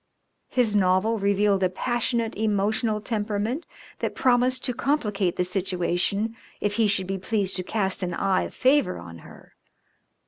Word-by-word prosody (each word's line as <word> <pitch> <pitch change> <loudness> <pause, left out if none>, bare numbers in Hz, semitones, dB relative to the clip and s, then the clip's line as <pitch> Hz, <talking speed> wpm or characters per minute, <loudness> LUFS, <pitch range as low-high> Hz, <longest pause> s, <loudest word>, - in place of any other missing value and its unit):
His 235 -5 +2
novel 200 +3 +2
revealed 200 0 +2
a 185 - +3
passionate, 235 +2 -1
emotional 215 +1 0
temperament 215 +6 -2 0.3
that - - -3
promised 255 0 +2
to 250 - -1
complicate 210 - 0
the 180 - +1
situation 185 +3 -1 0.2
if 205 +1 -1
he 225 -2 +4
should 200 -2 +2
be 190 +1 -3
pleased 200 0 -1
to 185 - -3
cast 195 -1 0
an 180 -2 -2
eye 190 0 +1
of - - -5
favour 265 -6 +2
on 85 -1 -10
her. - - -15
205 Hz, 150 wpm, -25 LUFS, 190-230 Hz, 0.3 s, he